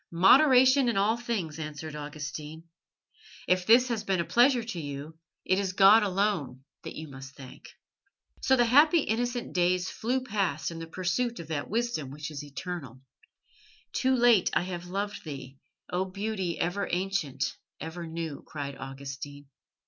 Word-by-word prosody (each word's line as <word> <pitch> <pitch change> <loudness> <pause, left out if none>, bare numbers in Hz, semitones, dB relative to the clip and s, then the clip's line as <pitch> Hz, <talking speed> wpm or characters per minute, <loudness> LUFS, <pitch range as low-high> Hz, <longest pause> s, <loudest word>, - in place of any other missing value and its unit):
"Moderation 260 - +6
in 230 - 0
all 205 +3 +3
things," 210 -10 -3
answered 150 0 -6
Augustine. 150 +1 -7 0.8
"If 180 0 +2
this 245 +3 +6
has 230 -3 -2
been 190 -2 0
a 170 - 0
pleasure 245 - +4
to 225 -6 -5
you, 145 +2 -7 0.3
it 185 +1 +2
is 190 -2 -2
God 200 +4 +7
alone 185 -10 -1 0.2
that - - -8
you 155 - -7
must 135 0 -11
thank." 130 -2 -12 0.7
So 265 - +4
the 240 -2 +4
happy 300 +7 +5
innocent 240 +1 -2
days 180 +1 +1
flew 255 +3 -1
past 190 - -1
in 165 - -7
the 165 - -7
pursuit 185 +8 -1
of 165 -2 -9
that 155 -3 -3
wisdom 225 - -1
which 150 +3 -7
is 145 -1 -6
eternal. 145 -3 -7 0.9
"Too 260 0 +2
late 240 -5 +5
have 175 -1 -2
I - - -12
loved 205 +2 -3
Thee, 135 -3 -8 0.3
O 180 +1 0
Beauty 190 -2 -3
ever 180 +4 -1
ancient, 175 -7 -1 0.2
ever 165 +1 -6
new!" 160 -3 -5
cried 140 -2 -6
Augustine. 135 +1 -8
180 Hz, 155 wpm, -28 LUFS, 150-220 Hz, 0.9 s, God